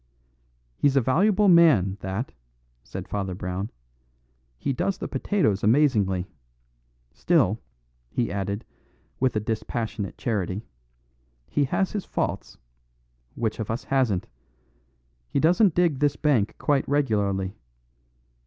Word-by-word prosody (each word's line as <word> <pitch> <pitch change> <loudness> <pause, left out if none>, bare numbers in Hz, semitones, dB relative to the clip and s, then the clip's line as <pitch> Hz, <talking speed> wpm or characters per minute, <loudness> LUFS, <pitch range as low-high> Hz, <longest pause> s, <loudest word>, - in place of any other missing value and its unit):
"He's 140 -1 +2
a 135 - +5
valuable 195 - +3
man, 150 - +5
that," 95 +7 -4 0.5
said - - -7
Father 95 -3 -3
Brown. 90 +3 -4 0.9
"He 140 - -1
does 185 +7 -1
the - - -4
potatoes 110 - 0
amazingly. 105 -7 +3 0.9
Still," 115 - +2 0.5
he 115 - -1
added, 100 +1 -3 0.5
with 130 -2 +1
a - - +2
dispassionate 110 -1 -3
charity, 105 -2 -2 0.8
"he 145 - +1
has 190 +8 0
his 205 -3 -3
faults; - - -3 0.8
which 115 -1 -2
of 110 - -4
us 115 +2 -2
hasn't? 125 -9 +1 1.0
He - - 0
doesn't 175 +4 +4
dig 170 -6 +2
this 145 -1 +2
bank 130 -9 +1
quite 145 -2 +1
regularly. 100 -9 +1
115 Hz, 115 wpm, -25 LUFS, 100-145 Hz, 1.0 s, a